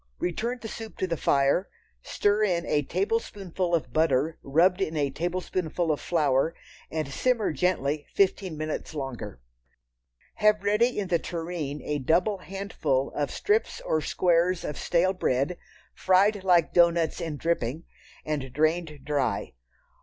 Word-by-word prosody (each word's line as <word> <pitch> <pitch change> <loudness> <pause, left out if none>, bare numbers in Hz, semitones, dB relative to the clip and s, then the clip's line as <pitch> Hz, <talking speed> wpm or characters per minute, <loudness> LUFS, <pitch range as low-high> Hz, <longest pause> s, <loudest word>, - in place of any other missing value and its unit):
Return 230 +8 -2
the 225 - -7
soup 225 0 -8
to - - 0
the 170 -2 -1
fire, 140 +5 +2 0.3
stir 205 - +1
in 175 -4 +1
a 150 - +1
tablespoonful 185 +1 -1
of 165 - -3
butter 155 0 +1
rubbed 180 +7 +3
in 160 -4 -1
a 140 -2 +1
tablespoonful 175 0 -2
of 150 - -2
flour, 150 -1 +1 0.3
and 155 -2 -2
simmer 235 - +1
gently 150 -4 0
fifteen 190 -4 +1
minutes 155 +1 -4
longer. 135 - -6 1.0
Have 210 -1 +3
ready 210 +5 +2
in 200 -3 -2
the 170 -3 +2
tureen 165 -4 -4
a 150 0 -2
double 180 +9 +1
handful 170 -9 -2
of 145 -1 -1
strips 420 +2 0
or 155 - 0
squares 175 +2 +2
of 150 - -4
stale 180 +5 +1
bread, 140 -1 0 0.3
fried 195 +2 +3
like 175 -3 +3
doughnuts 170 -1 +3
in 160 -3 -3
dripping, 160 -2 -1 0.4
and 140 -4 -3
drained 155 +1 0
dry. 135 -8 -1
170 Hz, 140 wpm, -27 LUFS, 150-185 Hz, 1.0 s, rubbed